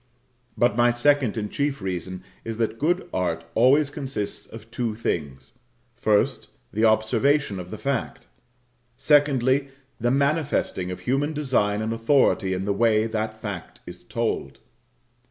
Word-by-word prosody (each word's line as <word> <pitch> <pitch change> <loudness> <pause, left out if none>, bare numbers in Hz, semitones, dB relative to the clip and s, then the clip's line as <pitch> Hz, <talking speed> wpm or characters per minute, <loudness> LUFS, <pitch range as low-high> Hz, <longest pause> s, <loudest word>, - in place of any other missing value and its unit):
But 120 0 +3
my 120 0 +4
second 120 -1 +2
and 105 -1 -3
chief 140 -1 -1
reason 95 -1 -4 0.2
is 115 -1 -5
that 115 0 -1
good 175 +5 +1
art 85 -3 -1
always 140 +5 +4
consists 135 -9 -4
of 115 0 -12
two 120 -3 -2
things: 70 - -4 0.4
First, 105 -1 +1 0.3
the 110 - 0
observation 110 +1 +2
of 90 - -7
fact; 135 -4 -3 0.7
secondly, 140 -2 +3 0.3
the 120 +1 +1
manifesting 140 - 0
of 90 - -6
human 140 +4 0
design 110 -8 0
and 110 +1 -1
authority 115 -4 +2
in 95 +1 -3
the 100 - +1
way 110 0 +3
that 110 -1 -3
fact 100 -6 -7
is - - -10
told. - - -3
115 Hz, 135 wpm, -24 LUFS, 105-140 Hz, 0.7 s, my